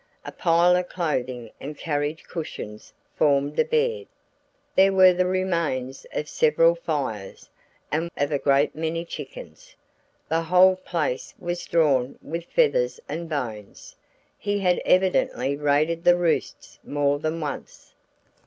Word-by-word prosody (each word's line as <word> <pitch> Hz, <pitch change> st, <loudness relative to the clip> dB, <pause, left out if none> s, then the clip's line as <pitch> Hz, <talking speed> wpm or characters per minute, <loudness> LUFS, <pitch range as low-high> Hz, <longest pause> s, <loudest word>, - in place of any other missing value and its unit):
A -, -, -6 dB
pile 175 Hz, 0 st, +3 dB
of 180 Hz, 0 st, -1 dB
clothing 130 Hz, -9 st, -3 dB
and 145 Hz, +2 st, -7 dB
carriage 150 Hz, 0 st, -2 dB
cushions 105 Hz, -10 st, -7 dB, 0.2 s
formed 145 Hz, 0 st, +2 dB
a -, -, +6 dB
bed. 465 Hz, -, 0 dB, 0.7 s
There 195 Hz, +1 st, +6 dB
were 185 Hz, -1 st, +6 dB
the 180 Hz, +1 st, +1 dB
remains 170 Hz, -9 st, -2 dB
of 150 Hz, -, -3 dB
several 160 Hz, +3 st, +3 dB
fires 140 Hz, -, -4 dB, 0.4 s
and 160 Hz, +3 st, -1 dB
of 145 Hz, +1 st, 0 dB
a 145 Hz, -, 0 dB
great 140 Hz, +1 st, +2 dB
many 165 Hz, +2 st, -2 dB
chickens -, -, -10 dB, 0.5 s
the 165 Hz, +1 st, +1 dB
whole 180 Hz, +3 st, +5 dB
place 165 Hz, -8 st, -3 dB
was 175 Hz, 0 st, -4 dB
strewn 140 Hz, -6 st, +1 dB
with 165 Hz, +2 st, -5 dB
feathers -, -, +1 dB
and 170 Hz, 0 st, -5 dB
bones; 115 Hz, -9 st, -6 dB, 0.4 s
he 205 Hz, 0 st, -1 dB
had 180 Hz, -3 st, +2 dB
evidently 180 Hz, -7 st, +2 dB
raided 150 Hz, +3 st, +1 dB
the 175 Hz, 0 st, +5 dB
roosts 175 Hz, -2 st, -2 dB
more 145 Hz, 0 st, 0 dB
than 155 Hz, +2 st, -2 dB
once. 150 Hz, -3 st, -7 dB
165 Hz, 135 wpm, -24 LUFS, 145-180 Hz, 0.7 s, a